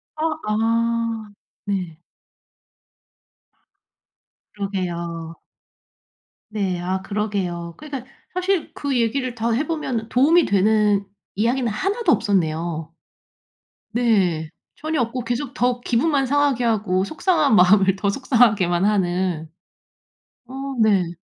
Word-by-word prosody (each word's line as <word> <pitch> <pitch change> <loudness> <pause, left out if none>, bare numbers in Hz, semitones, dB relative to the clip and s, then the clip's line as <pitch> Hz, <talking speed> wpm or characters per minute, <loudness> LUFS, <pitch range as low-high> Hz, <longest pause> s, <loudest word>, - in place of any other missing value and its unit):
아 310 - -4 0.2
아 230 0 0 0.3
네. 180 -6 -3 2.5
그러게요. 170 -4 -4 1.1
네. 195 -4 -1
아 185 +2 -2
그러게요. 190 -5 -3
그러니까 275 -4 -7 0.2
사실 365 -1 -1
그 280 -3 -2
얘기를 245 +2 -1
더 230 0 -1
해 275 +7 0
보면 260 -9 -3
도움이 310 +7 +4
되는 205 0 +2 0.3
이야기는 235 +3 +1
1 390 - -2
도 345 - +4
없었네요. 165 - 0 1.0
네. 190 -10 +1 0.3
전혀 310 -1 -2
없고 240 +1 -2
계속 245 +3 -3
더 245 -1 +1
기분만 270 +3 +1
상하게 280 -2 +2
하고 205 -5 +1
속상한 315 - +2
마음을 195 0 +5
더 200 +1 0
속상하게만 205 -8 +2
하는. 180 -5 0 1.0
어 255 - -11 0.3
네. 195 -6 +3
215 Hz, 205 characters per minute, -22 LUFS, 185-250 Hz, 2.5 s, 마음을